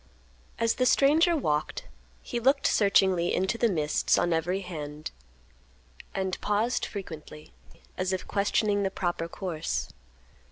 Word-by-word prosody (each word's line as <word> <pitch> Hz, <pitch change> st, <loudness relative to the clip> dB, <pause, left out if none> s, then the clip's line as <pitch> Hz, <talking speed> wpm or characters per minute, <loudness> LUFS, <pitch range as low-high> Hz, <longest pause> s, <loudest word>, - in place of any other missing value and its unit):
As 230 Hz, 0 st, +2 dB
the 255 Hz, -, +1 dB
stranger 320 Hz, +7 st, +4 dB
walked, 150 Hz, -, -1 dB, 0.4 s
he 240 Hz, -, -3 dB
looked 270 Hz, +4 st, +2 dB
searchingly 190 Hz, -4 st, +3 dB
into 190 Hz, +4 st, 0 dB
the 235 Hz, -, +3 dB
mists 155 Hz, -5 st, +1 dB
on 175 Hz, -, +2 dB
every 175 Hz, +4 st, 0 dB
hand, 155 Hz, -4 st, -6 dB, 1.0 s
and 190 Hz, -1 st, -2 dB
paused 215 Hz, +4 st, 0 dB
frequently 160 Hz, -6 st, -9 dB, 0.5 s
as 185 Hz, 0 st, 0 dB
if 185 Hz, -, -3 dB
questioning 205 Hz, 0 st, +1 dB
the 195 Hz, -, +1 dB
proper 175 Hz, -3 st, -2 dB
course. 155 Hz, -, -3 dB
190 Hz, 125 wpm, -28 LUFS, 165-215 Hz, 1.0 s, stranger